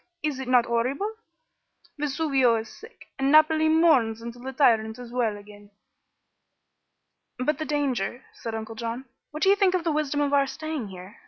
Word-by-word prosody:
is 295 -4 -2
it 265 - -5
not 250 -2 +4
horrible? 255 - -1 0.9
Vesuvio 275 -4 +2
is 220 0 -8
sick, 450 +2 -15
and 270 +1 +2
Naples 310 +1 +5
mourns 295 -9 +3
until 235 +1 -9
the 265 +1 -5
tyrant 225 -5 +2
is 245 -1 -10
well 235 -4 0
again." 205 0 -15 1.7
"But 280 +5 -1
the 310 - -2
danger," 265 -6 -2
said 225 -1 -6
Uncle 220 0 -6
John. 230 +3 -5 0.2
"What 305 +1 -5
do 385 - +5
you 400 - +6
think 390 -3 +2
of 360 - -1
the 330 - 0
wisdom 295 -1 -1
of 285 0 0
our 280 -1 +3
staying 310 -5 -5
here? 185 +1 -11
265 Hz, 175 wpm, -25 LUFS, 230-305 Hz, 1.7 s, you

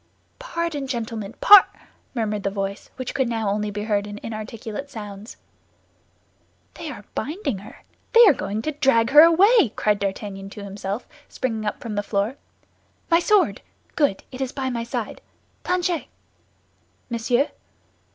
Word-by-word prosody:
"Pardon, 335 - -3
gentlemen—par—" 230 - +5 0.5
murmured 215 -3 -1
the 200 - -1
voice, 195 0 -4
which 255 -1 -5
could 265 -3 0
now 225 -2 -1
only 210 +1 -1
be 205 0 -4
heard 205 -1 0
in 205 0 -7
inarticulate 225 +3 -6
sounds. 210 -3 -9 1.4
"They 330 -2 -7
are 210 -8 -9
binding 285 - -3
her; 205 - -14 0.3
they 470 0 +9
are 390 - +7
going 210 -2 -4
to 310 - -1
drag 270 -5 +2
her 295 +2 +10
away," 355 - +6
cried 210 -1 +1
D'Artagnan 195 0 -4
to 205 0 -9
himself, 200 +2 -5 0.2
springing 220 -4 -3
up - - -3
from 230 -3 -5
the 205 - 0
floor. 205 +5 -1 0.7
"My 335 - +6
sword! 405 +2 +2 0.3
Good, 285 -11 +1
it 260 0 -7
is 260 -1 -2
by 265 -2 -3
my 235 -1 -2
side! 235 - -5 0.4
Planchet!" 355 -2 0 1.1
"Monsieur." 240 +4 +1
230 Hz, 145 wpm, -23 LUFS, 205-290 Hz, 1.4 s, her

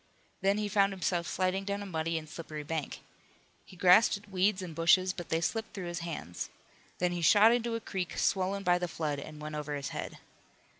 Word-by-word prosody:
Then 195 +1 +2
he 210 0 -1
found 200 -1 +3
himself 180 -2 -1
sliding 185 +1 0
down 200 +1 -3
a - - -7
muddy 165 -3 -2
and 155 -1 -6
slippery 155 -1 -7
bank. 155 -1 -4 0.6
He - - -15
grasped 185 +5 +6
at 200 0 -17
weeds 190 +1 +2
and 175 -3 -6
bushes, 180 +3 +4
but 175 -2 -8
they 165 0 +1
slipped 220 +6 -2
through 190 -3 -5
his 175 0 -4
hands. 160 - -5 0.5
Then 180 0 +1
he 175 -1 -3
shot 210 +7 +7
into 235 -1 0
a - - -2
creek, 190 -5 -4
swollen 195 +1 +1
by 180 -1 +3
the 180 - -1
flood, 155 -4 -3
and 150 +2 -9
went 150 0 -6
over 150 -1 -3
his 140 -2 -4
head. - - -5
180 Hz, 210 wpm, -31 LUFS, 160-195 Hz, 0.6 s, shot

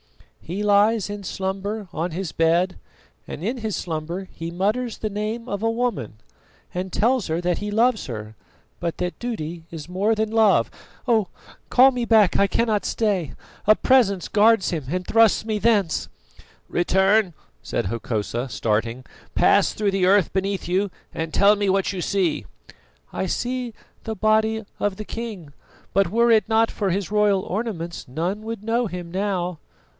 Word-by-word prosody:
"He 190 +5 -4
lies 210 +1 +3
in 205 0 -6
slumber 195 +3 -3
on 170 +3 -2
his 175 -1 -4
bed, 170 +3 +2 0.5
and - - -7
in 235 +6 -1
his 220 -3 -2
slumber 170 +3 -4
he 165 0 -6
mutters 215 +6 -1
the 215 - -3
name 215 +3 -3
of 200 -3 -3
a 225 - +2
woman, 225 - -2 0.6
and 185 +1 -3
tells 240 +3 +1
her 160 +1 -1
that 175 -1 0
he 205 0 -4
loves 230 +1 +2
her, 110 -3 -7 0.5
but 170 -1 -2
that 180 0 -3
duty 170 -9 -4
is 160 -3 -8
more 195 +5 +1
than 220 0 0
love. 220 -3 +4 0.4
Oh! 220 -5 +3 0.4
call 260 +2 +6
me 250 -2 -2
back 220 -5 +4
I 200 - +4
cannot 215 +1 +1
stay; 200 - -1 0.3
a 215 - +7
Presence 210 -9 +3
guards 220 -2 +4
him, 160 -6 -3
and 180 +3 -2
thrusts 225 -1 +4
me 215 -1 -1
thence." 205 -7 +1 0.6
"Return," 190 +2 +2 0.3
said - - -2
Hokosa 115 +3 -3
starting. 115 +3 -1 0.3
"Pass - - +4
through 210 -2 0
the 190 -2 +2
earth 195 -2 +3
beneath 195 -1 -1
you 190 +3 +1 0.2
and 160 0 -3
tell 200 +1 +5
me 205 -1 0
what 195 +1 +1
you 185 - -4
see." 180 -2 0 0.7
"I - - -2
see 245 +4 -2 0.3
the 220 - -4
body 220 +1 +2
of 205 -2 0
the 215 - -6
king; 205 -12 -7 0.4
but 195 -2 +3
were 235 +4 +3
it 220 -1 +3
not 225 0 +3
for 200 -3 -1
his 195 +2 -2
royal 205 -2 +3
ornaments 180 -7 -4
none 170 +10 -2
would 225 -1 -6
know 230 +2 +1
him 175 -2 -7
now." 180 -3 -2
200 Hz, 165 wpm, -23 LUFS, 175-220 Hz, 0.7 s, a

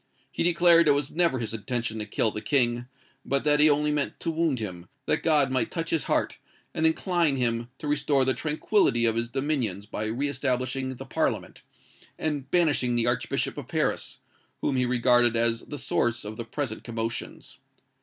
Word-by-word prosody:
He - - -4
declared 170 -1 +5
it 145 - +6
was 145 0 -2
never 170 -5 +2
his 115 -2 -4
intention 115 0 -3
to 105 - -4
kill 110 +1 +1
the 105 - -5
King: 120 -3 +1 0.4
but 140 0 -1
that 150 0 +3
he 155 +1 +7
only 150 +1 +2
meant 145 -1 -2
to 165 - -1
wound 160 -4 0
him, 90 -6 -6 0.2
that - - +1
God 150 -5 +3
might 130 - 0
touch 165 -1 -4
his 165 - 0
heart, - - -1 0.3
and 160 - +2
incline 165 -2 +1
him 120 -2 -1
to 150 - -7
restore 145 -2 +2
the 130 - +2
tranquillity 150 - +1
of 115 -1 +2
his 115 0 -1
dominions 130 -8 -2
by 105 +1 -4
re 120 +7 -1
establishing 130 -1 -2
the - - -9
Parliament, - - -2 0.6
and 145 -4 -3
banishing 145 -8 +2
the 120 -1 +1
Archbishop 120 0 -1
of - - -9
Paris, - - -1 0.4
whom 140 - 0
he 125 -1 +1
regarded 120 -1 +3
as 115 0 +2
the 145 - -8
source 120 -4 -1
of 105 +1 -6
the 115 - -6
present 140 +2 -4
commotions. 115 -1 -5
130 Hz, 185 wpm, -26 LUFS, 120-150 Hz, 0.6 s, he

